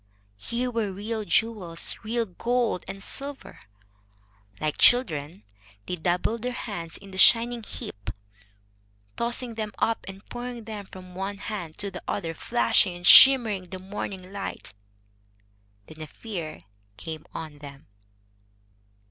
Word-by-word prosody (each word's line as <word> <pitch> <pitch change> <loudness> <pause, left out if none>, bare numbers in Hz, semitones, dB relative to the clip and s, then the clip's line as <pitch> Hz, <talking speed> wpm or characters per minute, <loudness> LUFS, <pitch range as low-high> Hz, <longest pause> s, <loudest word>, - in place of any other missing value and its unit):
Here 245 - -2
were 225 -4 -1
real 215 +3 -4
jewels, 200 -7 +1
real 230 +2 -1
gold 235 +1 0
and 195 0 -6
silver. 280 0 -7 1.0
Like 155 -1 -2
children, 160 - +4 0.4
they 180 - -2
dabbled 180 +7 0
their 250 +1 -2
hands 175 -9 -5
in 200 -1 -13
the 190 - -3
shining 235 +3 +6
heap, 100 - -7 1.1
tossing 235 0 0
them 215 -2 -4
up 225 - +1
and 195 +1 -10
pouring 240 -1 -6
them 210 -3 -7
from 185 -1 -11
one 195 +2 -4
hand 185 -7 -6
to 200 0 -2
the - - -7
other, 165 -5 -2
flashing 225 -1 +2
and 175 0 -8
shimmering 230 -8 +8
in - - -20
the 185 - -6
morning 190 0 -6
light. 195 - -5 1.1
Then 155 +5 -12
a 155 - -5
fear 170 - -6 0.4
came 155 +6 -7
on 155 -3 -7
them. 140 -1 -11
200 Hz, 135 wpm, -26 LUFS, 175-230 Hz, 1.1 s, shimmering